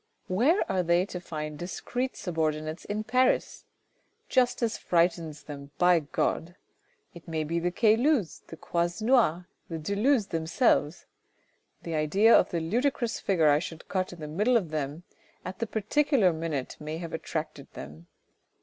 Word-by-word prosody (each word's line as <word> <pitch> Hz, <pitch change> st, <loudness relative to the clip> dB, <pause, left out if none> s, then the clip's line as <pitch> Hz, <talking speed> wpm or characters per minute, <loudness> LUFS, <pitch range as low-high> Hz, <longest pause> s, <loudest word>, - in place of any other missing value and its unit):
Where 255 Hz, -, +2 dB
are 190 Hz, -1 st, +1 dB
they 175 Hz, +1 st, +2 dB
to 180 Hz, -, -6 dB
find 155 Hz, -3 st, -6 dB
discreet 245 Hz, +8 st, -3 dB
subordinates 155 Hz, -2 st, -2 dB
in 210 Hz, +1 st, -3 dB
Paris? 255 Hz, +4 st, +1 dB, 0.6 s
Justice 245 Hz, -2 st, +2 dB
frightens 165 Hz, -3 st, 0 dB
them 140 Hz, -2 st, -9 dB
By 180 Hz, -1 st, +5 dB
God! 165 Hz, +3 st, -2 dB, 0.6 s
It 170 Hz, -, -13 dB
may 160 Hz, -1 st, -2 dB
be 165 Hz, +3 st, -1 dB
the 175 Hz, +1 st, 0 dB
Caylus's, 225 Hz, -, +2 dB
the 165 Hz, -, -10 dB
Croisenois', 175 Hz, +2 st, +1 dB, 0.3 s
the 165 Hz, -, -4 dB
de 160 Hz, +6 st, -3 dB
Luz's 225 Hz, -1 st, +2 dB
themselves. 165 Hz, -, +1 dB, 0.8 s
The 165 Hz, -, -5 dB
idea 190 Hz, +9 st, +4 dB
of -, -, +4 dB
the 170 Hz, -, -2 dB
ludicrous 235 Hz, -, 0 dB
figure 165 Hz, -6 st, +2 dB
I 145 Hz, 0 st, +4 dB
should 165 Hz, 0 st, -8 dB
cut 185 Hz, -1 st, -1 dB
in 175 Hz, -2 st, -11 dB
the 150 Hz, -, -5 dB
middle 210 Hz, +11 st, +2 dB
of 175 Hz, -8 st, -3 dB
them 150 Hz, +2 st, -3 dB, 0.4 s
at 185 Hz, +1 st, -6 dB
the 230 Hz, -, -2 dB
particular 220 Hz, -, +2 dB
minute 160 Hz, -5 st, -4 dB
may 155 Hz, +1 st, -5 dB
have 165 Hz, -1 st, -7 dB
attracted -, -, -5 dB
them. 80 Hz, +3 st, -10 dB
175 Hz, 150 wpm, -28 LUFS, 160-220 Hz, 0.8 s, By